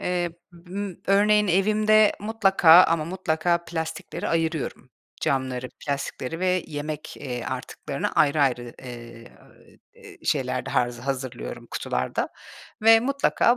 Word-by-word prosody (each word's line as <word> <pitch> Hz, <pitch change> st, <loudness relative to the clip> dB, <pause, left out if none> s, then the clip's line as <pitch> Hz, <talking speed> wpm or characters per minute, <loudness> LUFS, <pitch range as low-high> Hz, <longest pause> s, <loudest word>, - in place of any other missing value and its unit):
Eee, 175 Hz, -1 st, -1 dB, 0.4 s
ımm, 195 Hz, -1 st, -5 dB
örneğin, 210 Hz, +1 st, +4 dB
evimde 215 Hz, +3 st, +4 dB
mutlaka 195 Hz, -5 st, +6 dB
ama 165 Hz, -2 st, +1 dB
mutlaka 170 Hz, -1 st, 0 dB
plastikleri 160 Hz, -1 st, -4 dB
ayırıyorum. 160 Hz, -6 st, -2 dB, 0.3 s
Camları, 130 Hz, -2 st, -1 dB, 0.2 s
plastikleri 140 Hz, +2 st, -3 dB
ve 185 Hz, -1 st, +1 dB
yemek, 150 Hz, 0 st, -6 dB
eee, 125 Hz, -4 st, -5 dB
artıklarını -, -, -4 dB
ayrı 150 Hz, 0 st, +3 dB
ayrı, 120 Hz, -3 st, -1 dB
eee, 120 Hz, -2 st, -10 dB, 1.0 s
şeyler -, -, -1 dB
de -, -, -4 dB
ha -, -, +3 dB, 0.2 s
hazırlıyorum 130 Hz, -, -5 dB
kutularda 60 Hz, +1 st, -2 dB, 0.5 s
ve 225 Hz, 0 st, +7 dB
mutlaka 260 Hz, -1 st, +2 dB
165 Hz, 110 wpm, -25 LUFS, 135-195 Hz, 1.0 s, ve